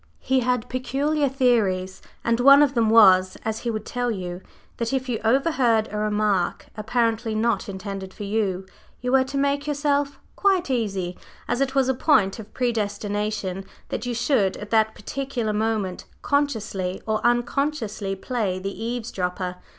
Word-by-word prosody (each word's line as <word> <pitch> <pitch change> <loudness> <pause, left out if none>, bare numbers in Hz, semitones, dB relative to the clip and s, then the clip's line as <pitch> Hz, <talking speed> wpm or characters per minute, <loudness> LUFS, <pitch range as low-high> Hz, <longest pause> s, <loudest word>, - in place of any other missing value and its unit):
He 265 0 +1
had 250 -2 0
peculiar 280 +3 0
theories, 205 -8 +1 0.2
and 230 0 +1
one 275 +3 +8
of 280 -2 +1
them 230 -4 +2
was, 185 -4 +6
as 220 0 -2
he 235 - -3
would 215 -2 -3
tell 245 0 -2
you, 180 -4 -4 0.4
that 235 +1 -2
if 260 0 -1
you 240 -3 -1
overheard 240 -3 +2
a 210 - -4
remark 210 -3 0
apparently 225 0 0
not 215 -3 0
intended 195 -1 -6
for 205 - -8
you, 200 -3 -1 0.3
you 250 0 -2
were 265 0 +5
to 275 +2 -5
make 280 +1 0
yourself 285 -1 0 0.2
quite 380 -7 +2
easy, 195 -7 -2 0.3
as 250 - -1
it 270 0 0
was 270 -2 +3
"a 265 - +2
point 235 -7 +2
of 220 -1 -10
predestination" 205 -4 -2 0.3
that - - -4
you 240 - -2
should 235 -5 +1
at 210 -1 -9
that 220 -1 +3
particular 260 -3 -3
moment, 210 -4 -1 0.2
consciously 215 -10 -1
or 220 0 -1
unconsciously, 240 -4 0
play 200 -2 -2
the 195 +1 -4
eavesdropper. 190 -6 -3
225 Hz, 160 wpm, -24 LUFS, 200-260 Hz, 0.4 s, one